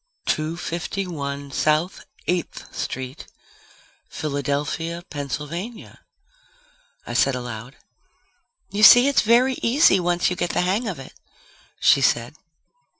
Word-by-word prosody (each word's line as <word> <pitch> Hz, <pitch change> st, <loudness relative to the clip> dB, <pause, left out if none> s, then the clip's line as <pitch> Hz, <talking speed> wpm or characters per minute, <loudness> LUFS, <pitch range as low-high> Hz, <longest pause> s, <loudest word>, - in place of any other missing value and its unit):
"Two 155 Hz, +2 st, -1 dB
fifty 175 Hz, +3 st, -4 dB
one 140 Hz, -4 st, -5 dB
South 155 Hz, +6 st, 0 dB, 0.2 s
Eighth 175 Hz, +2 st, -3 dB
Street, 130 Hz, 0 st, -5 dB, 0.8 s
Philadelphia, 150 Hz, +4 st, -3 dB
Pennsylvania," 150 Hz, -, -6 dB, 1.1 s
I -, -, -6 dB
said 135 Hz, -, +2 dB
aloud. 120 Hz, 0 st, -7 dB, 1.0 s
"You 205 Hz, -, -2 dB
see, 245 Hz, +4 st, +9 dB
it's 280 Hz, -, +3 dB
very 245 Hz, +3 st, +3 dB
easy 235 Hz, -, +4 dB
once 175 Hz, 0 st, +1 dB
you -, -, -1 dB
get 175 Hz, 0 st, -2 dB
the -, -, +1 dB
hang 195 Hz, +7 st, 0 dB
of 190 Hz, -, -4 dB
it," 135 Hz, -, -11 dB, 0.7 s
she 140 Hz, -, +5 dB
said. 120 Hz, -1 st, +1 dB
165 Hz, 115 wpm, -23 LUFS, 140-190 Hz, 1.1 s, see